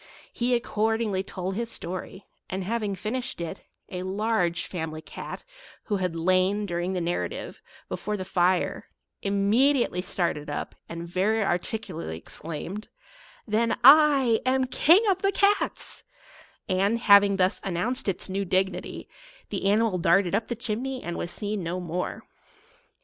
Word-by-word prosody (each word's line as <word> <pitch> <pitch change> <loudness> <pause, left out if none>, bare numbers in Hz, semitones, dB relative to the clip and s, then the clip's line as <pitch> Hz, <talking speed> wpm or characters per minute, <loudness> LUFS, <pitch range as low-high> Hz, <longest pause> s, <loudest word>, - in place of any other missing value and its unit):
He 245 +1 +1
accordingly 220 -3 0
told 190 -1 -4
his 230 +3 -3
sto 180 -5 -5
ry, 190 +2 -10 0.3
and, 190 +1 -3
having 210 0 -2
finished 245 +5 -4
it, 170 -1 -6 0.2
a 180 - -4
large 190 -3 0
family 160 -3 -4
cat, - - -8 0.4
who 205 - -1
had 180 -3 -2
lain, 185 +4 +2
during 175 0 -2
the 185 - -1
narrative, 170 +1 -3 0.3
before 210 0 -3
the 190 - -4
nre, 180 0 +1 0.4
immediately 205 +2 +2
started 170 -5 -1
up, 145 - -4 0.2
and 170 0 -6
very 200 +5 +1
articu 185 +3 -1
lately 80 - -5
exclaimed, 165 - -7 0.3
" - - -21 0.2
Then 225 +2 +1
I 275 -4 +7
am 260 0 +2
King 330 - +5
of 380 -2 +2
the 395 - +2
Cats 405 +1 +1 0.3
/" - - -20 0.2
and, 195 +4 +2
having 200 -3 +6
thus 185 0 +1
announced 195 +7 -1
its 190 - -2
new 195 +1 -2
dignity, 190 +1 -1 0.4
the - - -1
animal 210 -2 +2
darted 190 +1 +3
up 220 +3 0
the 240 - -2
chimney 250 +3 -3
and 175 0 -4
was 175 - -3
seen 205 +1 -3
no 175 +1 -3
more. 180 0 -4
200 Hz, 150 wpm, -26 LUFS, 180-230 Hz, 0.4 s, I